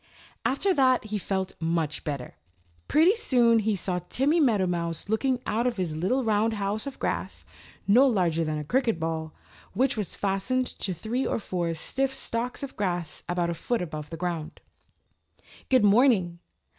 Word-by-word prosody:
After 380 +9 +1
that 260 -5 +3
he 215 -1 -3
felt 190 -1 -2
much 165 -2 -1
better. 140 -5 -4 0.5
Pretty 335 +7 +5
soon 240 - +3
he 215 -1 +1
saw 180 -1 -1
Timmy 290 +6 +2
Meadowmouse 180 - 0
looking 250 +3 +1
out 235 +3 0
of 240 -2 -2
his 175 -5 -2
little 195 +12 0
round 220 0 +2
house 205 +3 -2
of 275 - -6
grass, - - -3 0.4
no 245 +7 +6
larger 175 -8 +1
than 155 -1 -2
a 150 - -3
cricket 230 - +1
ball, 160 -1 -3 0.4
which 265 +1 +2
was 210 -5 -3
fastened 205 +6 0
to 190 -6 -5
three 235 +9 -2
or - - 0
four 180 -6 -2
stiff 270 +11 -1
stalks 245 +2 -3
of 275 - -6
grass 175 -5 -2
about 175 -1 0
a - - -1
foot 225 +5 -2
above 155 -3 -6
the 165 - -6
ground. 170 -3 -4 1.1
"Good 255 -4 +4
morning. 200 -6 +4
205 Hz, 165 wpm, -27 LUFS, 170-250 Hz, 1.1 s, no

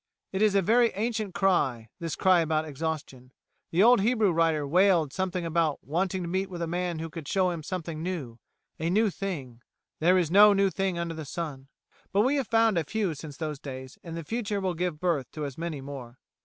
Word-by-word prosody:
It 190 - -2
is 215 -2 +4
a 195 - +4
very 235 +5 +4
ancient 215 -2 -2
cry 135 - +1
this 165 -2 -3
cry 185 -2 +4
about 160 -1 +1
exhaustion. 145 -4 -5 0.4
The 175 +4 +3
old 240 -2 +6
Hebrew 220 -2 +3
writer 165 -3 +2
wailed 170 -3 +3
something 185 -2 -2
about 165 -2 +1
wanting 180 +4 -1
to - - -4
meet 190 +2 -1
with 175 -2 -4
a - - 0
man 175 0 -2
who 165 +1 -4
could 160 -2 -8
show 185 +1 +2
him 170 - -4
a 170 +1 -4
new 155 -7 -5
thing. - - -43 0.4
A 160 +2 -1
new 210 +3 +3
thing? 140 -13 -5 0.4
"There 180 +4 +4
is 170 -3 +1
no 205 +2 +8
new 195 -1 +2
thing 195 -2 -1
under 170 -1 -2
the 160 -1 -6
Sun." 140 -3 -6 0.4
But 200 - +3
we 265 +6 +2
have 270 -5 -1
found 225 -5 +3
a - - -1
few 200 +1 -1
since 145 -1 -9
those 155 -3 -4
days, 130 -1 -8
and 165 -1 -6
the 165 - -5
future 210 +1 -2
will 190 -2 -1
give 175 -2 -2
birth 165 -8 0
to 155 -1 -4
as 140 -3 -6
many 165 -4 -4
more. 130 -3 -8
170 Hz, 220 wpm, -28 LUFS, 155-195 Hz, 0.4 s, no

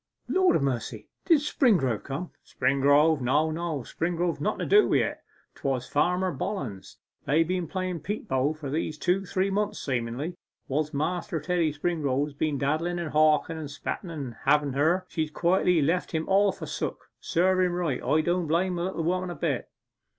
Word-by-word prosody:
what, - - -4
Lord 375 -1 +4
a - - +3
mercy, 120 -5 -3 0.2
did 325 -5 +5
Springrove 185 - +2
come?' 150 +6 -5
'Springrove, 145 +2 +3
no 145 +6 +2
no 160 -3 -3
Springrove's 170 +3 -2
nothen - - 0
to - - -1
do 415 +1 +5
wi' - - +3
it - - -1 0.3
'twas 130 -2 -2
Farmer 180 +5 +1
Bollens. 130 - -5 0.3
They've 160 +3 +3
been 180 -1 -1
playing 185 0 -3
bo - - -20
peep 205 +7 -4
for 140 +2 -1
these 155 0 -2
two 180 +4 +1
or - - -9
three 195 +1 0
months 210 +1 -1
seemingly. 130 +5 -3 0.3
Whilst 150 +2 -1
Master 165 +2 -1
Teddy 170 0 0
Springrove 145 -3 0
has 150 - -9
been 145 0 -1
daddlen, 155 +6 0
and 170 -3 -4
hawken, 155 +1 +3
and 150 -3 -6
spetten 155 +5 -5
about 140 -8 -6
having 145 -1 +3
her, 165 +7 +2
she's 155 -1 -2
quietly 175 0 +2
left 175 +6 0
him 160 0 -1
all 200 +1 +4
forsook. - - -5
Serve 185 +2 +2
him 180 -1 +2
right. 170 -7 -1
I 155 - +3
don't 175 +1 0
blame 175 +3 +1
the 170 - -1
little 185 -3 -3
woman 185 +2 0
a 175 - -5
bit. 145 -7 -2
160 Hz, 185 wpm, -27 LUFS, 145-180 Hz, 0.3 s, did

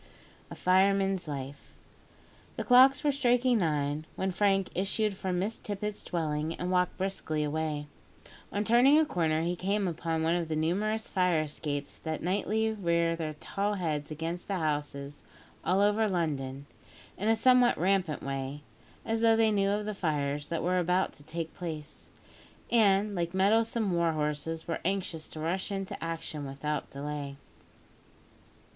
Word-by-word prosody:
A - - -8
FIREMAN'S 195 -1 +2
LIFE. 140 -1 -7 0.8
The - - -3
clocks 260 +2 +6
were 295 - +3
striking 250 -3 +3
nine 150 -2 -1
when 190 0 -1
Frank 195 0 +2
issued 200 +2 0
from 185 -1 -2
Miss 205 +5 -2
Tippet's 210 0 -4
dwelling 155 -2 -2
and 180 +1 -3
walked 180 0 +1
briskly 185 -5 -2
away. 150 0 -2 0.7
On 205 - 0
turning 245 +6 +6
a 315 - +5
corner 160 - 0
he 175 +1 0
came 195 +2 0
upon 165 -1 -2
one 165 +1 +2
of 175 -2 -1
the 155 - -2
numerous 205 +8 0
fire 180 -4 +2
escapes 145 -1 -4
that 160 -1 -4
nightly 210 +4 +1
rear 170 -5 +1
their 155 -2 -4
tall 200 +6 -2
heads 155 -6 -2
against 165 +3 -4
the 200 - -1
houses 145 -3 -3 0.4
all 190 +2 +2
over 210 +1 +3
London, 140 -6 -2 0.5
in 210 +3 -1
a 225 - +5
somewhat 250 +1 +5
rampant 180 -3 +1
way, 135 +1 -4 0.4
as 225 0 -1
though 225 -1 +5
they 225 -1 +4
knew 200 -1 +2
of 205 +1 0
the 215 - -2
fires 145 -5 -1
that 165 - -2
were 180 +1 +2
about 180 +2 +1
to 145 - -12
take 165 +1 -5
place, 155 -4 -6 0.6
and, 205 -2 +4
like 170 -1 -2
mettlesome 220 +2 +2
war 170 -1 +2
horses, 150 +1 -2
were 165 - -2
anxious 175 -4 -2
to 155 - -8
rush 175 +6 -1
into 195 -3 -4
action 165 -2 -4
without 145 +2 -3
delay. 140 0 -5
175 Hz, 155 wpm, -30 LUFS, 155-200 Hz, 0.8 s, clocks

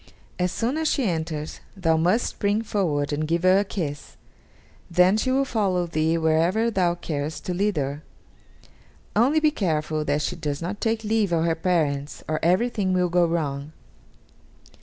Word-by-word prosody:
As 180 0 +1
soon 240 +9 -1
as 320 0 0
she 280 - +1
enters, 160 -5 -3 0.2
thou 165 -4 +2
must 180 +9 +2
spring 205 +2 -1
forward 155 -10 -1
and 155 +1 -1
give 170 +2 0
her 185 +1 +5
a - - +2
kiss; 160 -8 -5 0.7
then 180 +3 +4
she 220 +4 0
will 270 +1 +2
follow 195 -8 0
thee 160 0 0
wherever 165 +8 +2
thou 180 -4 +1
carest 155 -3 -4
to 180 - -2
lead 200 0 0
her; 140 +1 -2 1.1
only 260 +9 +4
be 305 -1 +3
careful 155 - -1
that 145 +1 0
she - - -2
does 145 -2 -3
not 185 +5 -5
take 225 0 0
leave 215 -3 +1
of 165 -1 +2
her 165 - +2
parents, 155 -5 -1
or 155 0 -1
everything 190 +2 +1
will 180 -1 +2
go 175 0 +3
wrong." 150 -3 -3
175 Hz, 170 wpm, -24 LUFS, 155-205 Hz, 1.1 s, her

